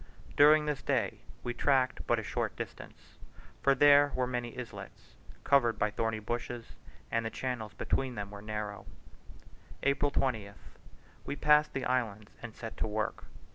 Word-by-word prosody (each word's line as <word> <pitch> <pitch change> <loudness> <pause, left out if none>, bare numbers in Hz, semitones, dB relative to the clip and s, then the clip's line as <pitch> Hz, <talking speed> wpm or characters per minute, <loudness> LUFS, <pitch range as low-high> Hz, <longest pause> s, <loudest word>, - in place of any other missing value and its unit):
During 150 +1 +7
this 150 -2 -2
day - - 0 0.2
we 120 - -2
tracked 130 -1 +1
but - - +3
a - - -3
short - - -2
distance, - - -9 0.4
for 140 0 +4
there 145 +1 +6
were 130 - +1
many 120 -1 -4
islets, 125 -2 -9 0.3
covered 120 -5 +3
by 105 -2 +1
thorny 115 0 -1
bushes, 120 +2 -5 0.4
and 115 0 +1
the 115 - -2
channels 115 -4 -4
between 130 -2 -1
them 100 -1 -5
were 100 0 -9
shallow. 105 -2 -5 1.0
April 140 +1 +2
20th. 110 -8 -3 0.4
We - - -4
passed 150 +1 +4
the 135 - -2
islands 110 -5 -1
and 120 -2 -8
set 115 -1 -7
to - - -1
work. 110 0 -3
120 Hz, 155 wpm, -31 LUFS, 110-140 Hz, 1.0 s, During